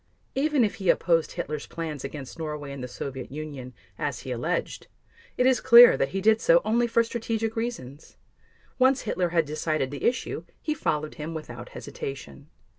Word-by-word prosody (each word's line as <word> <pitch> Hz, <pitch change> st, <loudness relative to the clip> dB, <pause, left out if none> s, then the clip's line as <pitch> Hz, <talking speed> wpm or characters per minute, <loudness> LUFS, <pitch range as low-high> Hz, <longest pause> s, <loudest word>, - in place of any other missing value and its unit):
Even 285 Hz, -1 st, +2 dB
if 215 Hz, 0 st, -1 dB
he 190 Hz, -4 st, -1 dB
opposed 165 Hz, -2 st, +2 dB
Hitler's 150 Hz, -1 st, -4 dB
plans 160 Hz, -5 st, -5 dB
against 135 Hz, +2 st, -7 dB
Norway 150 Hz, -3 st, -5 dB
and 140 Hz, -2 st, -7 dB
the -, -, -4 dB
Soviet 130 Hz, +1 st, -6 dB
Union, 140 Hz, -4 st, -7 dB, 0.3 s
as 145 Hz, -6 st, -2 dB
he 130 Hz, 0 st, -6 dB
alleged, 155 Hz, +9 st, -2 dB, 0.5 s
it 250 Hz, -, +3 dB
is 260 Hz, -1 st, +4 dB
clear 240 Hz, +1 st, +9 dB
that -, -, 0 dB
he 195 Hz, -, -3 dB
did 220 Hz, +2 st, +4 dB
so 165 Hz, +1 st, +6 dB
only 235 Hz, +2 st, +2 dB
for 230 Hz, 0 st, +3 dB
strategic 225 Hz, -1 st, -3 dB
reasons; 160 Hz, -, -5 dB, 0.6 s
once 260 Hz, 0 st, +4 dB
Hitler 185 Hz, -5 st, -1 dB
had 165 Hz, -1 st, +2 dB
decided 155 Hz, -2 st, -1 dB
the 145 Hz, -, -5 dB
issue, 255 Hz, -, -1 dB, 0.2 s
he 305 Hz, -, -2 dB
followed 155 Hz, -, -2 dB
him 160 Hz, +2 st, -5 dB
without 125 Hz, -6 st, -8 dB
hesitation. 135 Hz, -, -8 dB
160 Hz, 175 wpm, -26 LUFS, 140-225 Hz, 0.6 s, clear